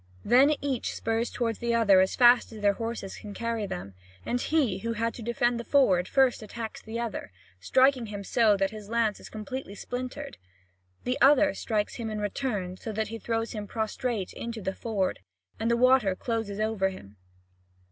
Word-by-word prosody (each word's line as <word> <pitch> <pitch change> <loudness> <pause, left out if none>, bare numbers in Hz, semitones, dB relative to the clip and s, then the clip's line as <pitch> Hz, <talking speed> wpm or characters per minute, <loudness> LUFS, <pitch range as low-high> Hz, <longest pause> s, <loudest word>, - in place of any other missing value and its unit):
Then 270 +6 +5
each 275 -4 -2
spurs 225 +1 -1
toward 230 -2 -2
the 235 0 0
other 200 -5 +6
as 190 - +1
fast 240 0 +6
as 220 -2 -9
their 200 -1 +5
horses 225 -2 -5
can 205 -2 -9
carry 230 -3 -2
them. 95 - -6 0.3
And 245 0 -1
he 265 -12 +1
who 230 +3 -2
had 230 +1 -1
to - - -9
defend 240 +1 0
the - - -4
ford 195 -11 +3
first 265 -3 +3
attacks 220 +1 -7
the 225 +1 -5
other, 230 - -4 0.3
striking 260 - +3
him 205 -1 -6
so 230 +3 +1
hard 205 -2 +5
that 195 +1 +2
his 210 -2 -9
lance 230 -2 +1
is - - -11
completely 215 0 -6
splintered. 250 - -6 0.7
The 250 +1 -2
other 290 +1 +6
strikes 210 -2 -2
him 230 -2 -4
in 215 -1 -3
return 205 -4 -2
so 220 - -6
that 215 0 -2
he 225 0 -6
throws 225 0 -2
him 210 -2 -5
prostrate 220 -2 -2
into 230 -1 -5
the 190 -2 -3
ford, 200 -3 -2 0.4
and 225 +1 0
the 235 - +3
water 255 -6 +4
closes 225 -2 -3
over 215 -3 +1
him. 105 - -12
225 Hz, 190 wpm, -28 LUFS, 205-240 Hz, 0.7 s, other